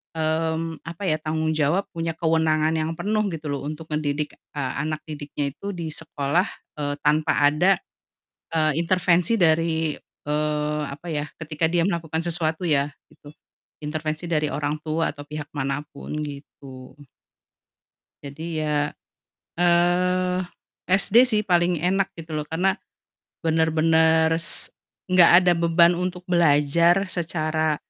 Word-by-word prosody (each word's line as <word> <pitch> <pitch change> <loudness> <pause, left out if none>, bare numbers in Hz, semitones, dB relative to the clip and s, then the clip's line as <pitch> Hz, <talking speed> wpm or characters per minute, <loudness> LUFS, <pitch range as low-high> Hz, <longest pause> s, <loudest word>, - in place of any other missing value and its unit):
mmm, 160 +1 -1
apa 170 +4 -7
ya, 155 - +2
tanggung 160 0 -1
jawab, 155 +5 +1
punya 165 -1 -2
kewenangan 160 -1 +2
yang 160 +1 -1
penuh 215 +4 0
gitu 160 -2 -6
loh 140 0 -3
untuk 155 +1 -7
ngedidik, 150 0 -2 0.2
eee, 135 -3 -2
anak 155 +1 -3
didiknya 145 -2 -4
itu 200 0 -5
di 170 -2 -4
sekolah, 155 +4 0 0.3
eee, 145 -1 -1
tanpa 150 +1 +2 0.2
ada, 180 +6 +3 0.8
eee, 155 -1 +3
intervensi 180 +2 +2
dari, 160 -2 +2 0.3
eee, 150 0 -1
apa 145 +5 -10
ya 150 -1 -2
ketika 155 0 -1
dia 170 0 +2
melakukan 165 -3 -2
sesuatu 165 0 -1
ya, 145 -2 +1 0.2
gitu 145 - -15 0.5
intervensi 155 +2 -3
dari 155 -3 0
orang 150 +1 -2
tua 160 +1 -1
atau 145 0 -11
pihak 150 -1 -6
manapun 145 +1 -4
gitu. 140 -2 -11 1.3
Jadi 155 +3 -6
ya, 150 -1 0 0.7
eee, 180 +1 +2 0.5
SD 195 +3 +2
sih 215 -4 +2
paling 175 -4 +1
enak 190 +2 +1
gitu 160 -2 -6
loh, 150 - -3
karena 185 +6 0 0.6
bener-bener 160 0 +3
s 170 +1 -3 0.4
nggak 185 -2 +6
ada 175 - +5
beban 170 +1 +4
untuk 180 0 -3
belajar 170 +2 +3
secara 155 -2 -1
160 Hz, 130 wpm, -24 LUFS, 150-170 Hz, 1.3 s, nggak